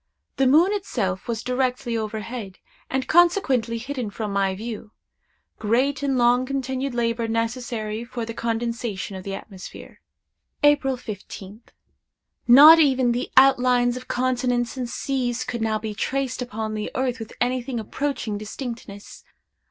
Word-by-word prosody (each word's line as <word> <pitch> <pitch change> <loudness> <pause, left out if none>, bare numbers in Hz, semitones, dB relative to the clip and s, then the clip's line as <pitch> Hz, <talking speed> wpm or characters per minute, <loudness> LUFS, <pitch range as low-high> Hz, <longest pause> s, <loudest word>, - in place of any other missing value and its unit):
The 270 - +3
moon 330 +9 +5
itself 205 - -2
was 230 -2 -3
directly 250 -1 -1
overhead, 215 -2 -5 0.3
and 265 0 -1
consequently 300 - +3
hidden 250 -1 -4
from 205 0 -4
my 195 -1 +1
view. 220 0 -7 0.7
Great 255 +7 +1
and 275 -2 0
long 245 +1 +4
continued 265 0 -3
labor 230 -1 0
necessary 230 -1 -2
for 240 -1 -5
the 230 - -6
condensation 230 -4 -3
of 190 - -7
the 195 0 -4
atmosphere. 195 -1 -11 0.6
"April 290 -3 +3
15th. 205 -1 -9 0.8
Not 295 +7 +10
even 260 -5 +3
the 245 +1 -2
outlines 250 -2 +5
of 255 - -8
continents 245 -1 0
and 250 -2 -4
seas 250 -1 -2
could 240 -2 -4
now 220 -1 +1
be 215 0 -5
traced 260 +4 -2
upon 220 -3 -4
the 210 -1 -3
earth 255 -1 -1
with 225 - -8
anything 250 0 -1
approaching 225 -2 -3
distinctness. 215 -2 -8
240 Hz, 135 wpm, -23 LUFS, 220-260 Hz, 0.8 s, Not